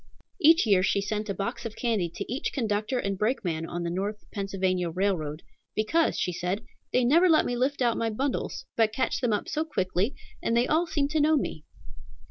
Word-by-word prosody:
Each 325 0 +6
year 200 -4 +4
she 195 - +2
sent 210 +1 -3
a - - 0
box 200 +4 -3
of 230 -2 -6
candy 220 -8 0
to - - -4
each 265 - -2
conductor 220 -1 -1
and 195 -5 -2
brakeman 180 -8 -1
on 175 +1 -4
the 170 - -2
North 200 +4 -3
Pennsylvania 190 -3 -1
Railroad, 165 -4 -1 0.3
"Because," 315 +10 +2
she 180 - -1
said, 180 +6 -2 0.3
"they 250 -1 +3
never 335 +8 +5
let 315 - +5
me 245 - -1
lift 260 +2 0
out 235 -2 +2
my 230 - 0
bundles, 260 +5 -2
but 220 -1 +2
catch 260 - 0
them 245 -3 +1
up 210 - -1
so 310 - -1
quickly, 200 - -1 0.3
and 230 - +1
they 240 - +4
all 325 +5 +2
seem 290 -4 0
to 310 0 +1
know 310 +1 +4
me." 155 - -3
215 Hz, 205 wpm, -27 LUFS, 190-260 Hz, 0.3 s, Each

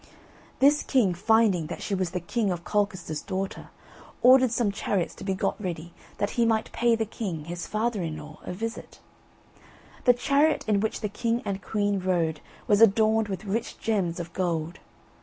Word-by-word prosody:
This 285 +2 +5
king 230 -9 +2
finding 200 -3 +3
that - - -6
she 205 - -3
was 185 -2 0
the 180 +1 -3
King 205 +4 -1
of 175 -1 -4
Colchester's 185 -7 -1
daughter, 190 +1 -4 0.5
ordered 255 0 +7
some 235 -3 +1
chariots 200 -3 -1
to - - -11
be 195 -1 -1
got 190 - -2
ready, 175 -3 -5 0.2
that 205 - -1
he 235 - +1
might 225 -1 +1
pay 235 -1 +2
the 225 0 -1
king, 185 -8 -5
his 175 +1 -5
father 220 -1 -1
in 160 -2 -3
law, 150 0 -11
a - - -5
visit. 225 +5 -6 1.1
The 245 - +7
chariot 285 +5 +2
in 210 -2 +3
which 220 +2 -2
the 210 - 0
king 230 +4 -1
and 195 -1 -3
queen 205 0 0
rode 170 -4 0 0.2
was 205 0 +3
adorned 220 0 +4
with 195 0 -5
rich 215 +4 -3
gems 190 -7 -1
of 170 -1 -6
gold. 170 -2 -2
200 Hz, 180 wpm, -26 LUFS, 175-225 Hz, 1.1 s, ordered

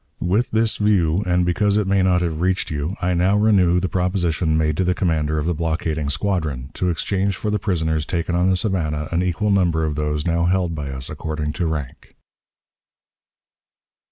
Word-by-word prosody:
"With 100 +8 +1
this 110 0 +1
view, 95 -5 +2
and 90 0 +2
because 100 +4 +1
it 105 - +1
may 95 0 +2
not 90 -1 +2
have 80 -2 -2
reached 95 -1 0
you, 75 +5 -3
I 90 0 +2
now 90 +4 +2
renew 95 -5 +4
the 95 - -1
proposition 90 -3 0
made 75 -1 +1
to 95 - +2
the 90 0 +1
commander 80 -4 0
of 75 - -1
the 85 - +1
blockading 80 -2 -2
squadron, 75 -5 -2
to 90 - -1
exchange 95 +3 -1
for 105 - -3
the 105 - 0
prisoners 80 -6 -1
taken 85 -1 -2
on 90 +2 +2
the 95 - +3
Savannah 80 -6 -1
an 85 +1 +1
equal 90 +4 0
number 85 -5 +2
of 75 - -1
those 75 0 -2
now 85 0 +1
held 90 -1 +1
by 75 -3 -5
us 65 -1 -5
according 75 0 -4
to 85 -1 -1
rank." 75 -6 -6
85 Hz, 190 wpm, -21 LUFS, 80-95 Hz, -, renew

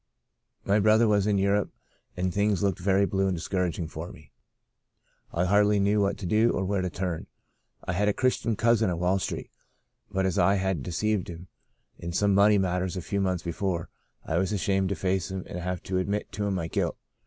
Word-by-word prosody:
My 100 +2 +3
brother 110 +2 +4
was 105 -1 +2
in 105 -1 +2
Europe, 100 +1 +1 0.5
and 90 0 -1
things 100 -2 +1
looked 100 -4 0
very 95 +2 +3
blue 95 +1 0
and 95 -2 -1
discouraging 90 -1 -2
for 80 +3 -7
me. 75 -4 -16 1.0
I 85 +2 0
hardly 105 +2 +4
knew 100 +1 +2
what 100 0 0
to 100 - -7
do 110 +5 +3
or 95 - -1
where 100 0 0
to 90 - -1
turn. 90 -2 -4 0.6
I - - -3
had 105 +3 +1
a 105 - +3
Chris 130 +3 +1
tian 115 -2 -1
cousin 115 -1 +3
on 85 - -1
Wall 90 +3 +1
Street, - - -4 0.6
but 95 0 0
as 95 - 0
I 100 - +4
had 95 -5 -1
de 65 - -6
ceived 105 +3 0
him 85 +1 -9 0.5
in 85 0 -5
some 100 +2 +2
money 100 +1 +5
matters 90 0 -1
a - - -3
few 100 +3 -1
months 90 -2 -1
before, 85 0 -2 0.4
I 80 - 0
was 95 +2 0
ashamed 95 -1 +1
to 100 - -1
face 95 -1 -1
him 95 -1 -4
and 90 - -6
have 90 0 -4
to 95 0 -1
admit 100 +3 -2
to 105 0 -2
him 100 - 0
my 85 -3 -2
guilt. - - -1
95 Hz, 215 wpm, -27 LUFS, 90-100 Hz, 1.0 s, money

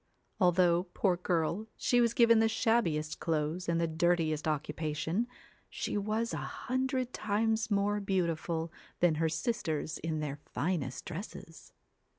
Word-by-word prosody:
Although, 180 -1 +4
poor 190 -3 +3
girl, 175 +4 -1
she 245 -1 +3
was 235 -1 +2
given 230 -1 +6
the 225 0 +4
shabbiest 165 -11 +1
clothes, 160 +2 -1
and 170 0 +2
the 170 - +2
dirtiest 160 -1 +1
occupation, 155 +6 -1 0.4
she - - -3
was 215 +3 -1
a - - -1
hundred 255 0 -2
times 220 +2 0
more 205 0 +1
beautiful 170 -4 -1 0.3
than 175 -2 +4
her 160 - +3
sisters 160 -3 -2
in 160 -1 -2
their 145 -2 -3 0.2
finest 150 -7 -2
dresses. 165 -3 -8
175 Hz, 135 wpm, -32 LUFS, 160-220 Hz, 0.4 s, given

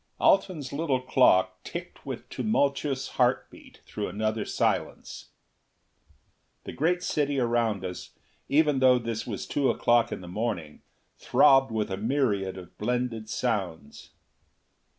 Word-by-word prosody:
Alten's 175 -8 +2
little 140 -3 0
clock 125 -7 +3
ticked - - -8
with - - -6
tumultuous 140 -9 0
heartbeat - - -2
through - - -4
another 110 +3 -2
silence. - - -2 1.3
The - - -7
great 175 +4 0
city 145 -2 0
around 115 -5 0
us, 90 -1 -6 0.4
even 150 -1 +3
though 130 -1 +5
this 115 -2 -4
was 105 -5 -4
two 140 -2 0
o'clock 120 -1 +2
in - - -5
the 90 - -10
morning, 90 -6 -4 0.4
throbbed 135 -2 +4
with 110 -3 -2
a 95 - -2
myriad 105 -5 0
of 90 -2 -12
blended 115 -1 -2
sounds. 95 - -3
120 Hz, 125 wpm, -27 LUFS, 105-140 Hz, 1.3 s, though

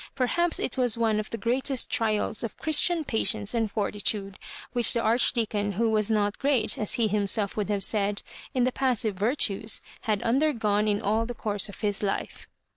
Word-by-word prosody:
Perhaps 330 +7 +1
it - - -2
was 245 -3 +2
one 220 -2 +1
of 215 - -5
the 230 - -4
greatest 250 +4 0
trials 215 0 0
of 230 - -5
Christian 315 +2 +2
patience 220 -4 +1
and 225 -2 0
fortitude 200 -1 -2 0.3
which 240 -2 +4
the 235 - +1
Arch 230 +2 +3
deacon, 210 -3 -1
who 225 +3 0
was 215 -1 +1
not 205 -2 0
great, 275 -4 +2
as 210 - +1
he 230 -2 +1
himself 205 0 0
would 210 -1 -2
have 200 -2 0
said, 205 0 +1 0.3
in 255 - 0
the 255 - +2
passive 250 -5 0
virtues, 215 0 0 0.3
had 210 -2 0
undergone 230 -5 +1
in 205 -1 0
all 220 +3 0
the 245 - -6
course 205 -2 -1
of 200 - -11
his 205 -2 0
life. 200 -2 -4
220 Hz, 190 wpm, -26 LUFS, 205-245 Hz, 0.3 s, which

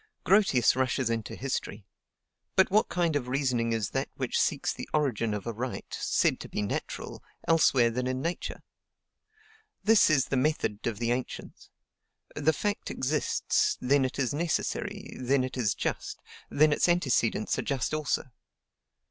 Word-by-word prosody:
Grotius 190 - +4
rushes 130 -2 0
into 115 -1 -3
history; 115 -6 -4 0.7
but 190 0 +4
what 215 +2 +3
kind 170 -3 0
of 130 -4 -1
reasoning 125 -3 0
is 110 -3 -1
that - - -2
which - - -1
seeks - - 0
the - - -8
origin 125 -7 +1
of 105 -2 -4
a 115 - -3
right, 125 +3 -4
said - - +1
to - - -8
be 105 - -2
natural, 100 - -5 0.2
elsewhere 135 -7 +4
than 125 +2 -2
in 130 0 -1
Nature? 170 +6 -4 1.2
This 220 -2 +5
is 140 -4 +2
the - - 0
method 125 -7 0
of 115 -3 -2
the 120 +1 -1
ancients: 125 +1 -5 0.7
the 150 +2 +3
fact 205 +6 -2
exists, 145 +4 0
then 135 +2 +3
it 130 0 -2
is 135 -1 0
necessary, 160 +1 -2
then 130 +1 +2
it 130 - -4
is 115 -7 0
just, - - -3 0.3
then 150 +1 +4
its 160 - +2
antecedents 130 -10 +1
are - - +1
just 135 +1 -2
also. 150 -4 -1
130 Hz, 155 wpm, -28 LUFS, 120-155 Hz, 1.2 s, This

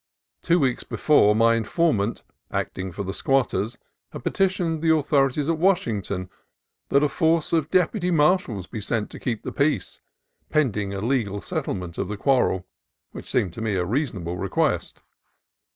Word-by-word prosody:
Two 170 0 +3
weeks 130 -4 0
before, 105 -9 +3
my 115 +1 +4
informant, 115 - 0 0.3
acting 95 0 -3
for 100 - -5
the 95 0 -4
squatters, 120 -3 0 0.3
had - - -8
petitioned 180 -4 0
the 165 - +1
authorities 145 -2 +2
at 165 -1 0
Washington 105 - 0 0.6
that 140 +1 +4
a - - +4
force 165 +3 +1
of 160 -2 +1
deputy 180 +1 +1
marshals 150 - +2
be 110 - -7
sent 110 +1 -2
to - - -9
keep 115 -4 -3
the - - -4
peace, 140 -9 -1 0.5
pending 110 -10 0
a 100 -1 -4
legal 110 -4 0
settlement 90 -2 -4
of 100 - -1
the 105 +1 -4
quarrel; 125 -7 +2 0.5
which - - -10
seemed 90 -4 0
to 115 - -7
me 110 -3 -1
a 90 -1 0
rea 135 - 0
sonable 90 -5 -6
request. - - -1
125 Hz, 160 wpm, -24 LUFS, 100-155 Hz, 0.6 s, my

